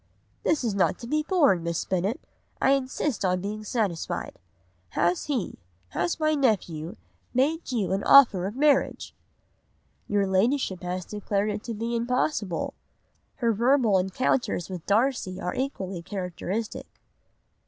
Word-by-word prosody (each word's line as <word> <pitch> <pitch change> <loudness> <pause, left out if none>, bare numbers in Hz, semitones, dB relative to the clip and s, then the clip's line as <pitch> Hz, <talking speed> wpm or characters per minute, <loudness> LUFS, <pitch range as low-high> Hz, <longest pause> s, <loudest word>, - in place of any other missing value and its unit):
"'This 310 -4 +1
is 225 -4 0
not 195 -2 +2
to - - -9
be 305 +6 +1
borne, 300 - +3
Miss 170 0 -2
Bennet, 190 +6 -1 0.4
I 270 - +3
insist 270 -2 0
on 180 -1 +2
being 210 +2 -4
satisfied. 205 -7 -2 0.6
Has 175 +1 +2
he, 265 -9 -2 0.3
has 175 - -1
my 310 0 +2
nephew, 190 - 0 0.4
made 295 +5 +1
you 220 -7 0
an 195 +1 0
offer 210 -10 +7
of 205 - -6
marriage?' 285 0 +2 0.9
"'Your 205 -1 +2
Ladyship 190 +1 +1
has 180 0 -4
declared 210 0 -1
it 210 0 -4
to 230 - -4
be 230 +2 -2
impossible.'" 250 - -1 0.6
Her 235 -2 +1
verbal 235 -3 +3
encounters 190 0 0
with 180 -3 -7
Darcy 215 -3 +1
are 180 - -3
equally 195 -9 -3
characteristic. 190 +3 -4
210 Hz, 135 wpm, -26 LUFS, 185-260 Hz, 0.9 s, offer